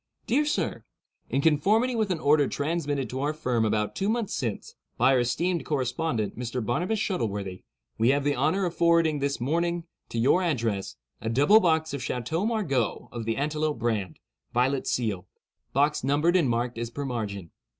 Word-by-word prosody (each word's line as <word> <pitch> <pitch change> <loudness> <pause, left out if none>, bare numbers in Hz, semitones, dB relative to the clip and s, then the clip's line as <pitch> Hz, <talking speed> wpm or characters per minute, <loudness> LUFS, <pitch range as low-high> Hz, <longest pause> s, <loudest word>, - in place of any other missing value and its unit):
"Dear 280 +6 +2
Sir—In 295 - -4
conformity 205 - +3
with 220 -3 0
an 180 -3 -1
order 145 -1 +4
transmitted 145 -2 -1
to 130 +1 -3
our 150 +2 -1
firm 125 -7 0
about 105 -1 0
two 195 +1 0
months 225 -2 -1
since, 115 -7 -3 0.2
by 135 - +4
our 130 - +4
esteemed 155 +7 0
correspondent, 130 -5 -1
Mr. 120 0 -3
Barnabus 175 - 0
Shuttleworthy, 105 - -3 0.3
we 115 +2 +4
have 140 +1 +2
the 145 0 +2
honor 155 +9 +1
of 175 - -2
forwarding 165 -3 +3
this 140 0 -1
morning, 170 +6 0 0.3
to - - -5
your 130 +10 +4
address, 115 - -1 0.3
a 110 - -2
double 145 - +6
box 160 -5 +1
of 140 - -3
Chateau 160 - -2
Margaux 180 - -1
of 115 -2 -5
the 115 0 -1
antelope 150 +1 -1
brand, 110 -7 -2 0.4
violet 130 +2 +1
seal. 105 -7 -1 0.4
Box 145 +1 +2
numbered 150 +6 +2
and 165 -8 +3
marked 120 0 -1
as 120 0 -3
per 140 +4 -5
margin. 105 -8 -4
140 Hz, 170 wpm, -27 LUFS, 120-170 Hz, 0.4 s, double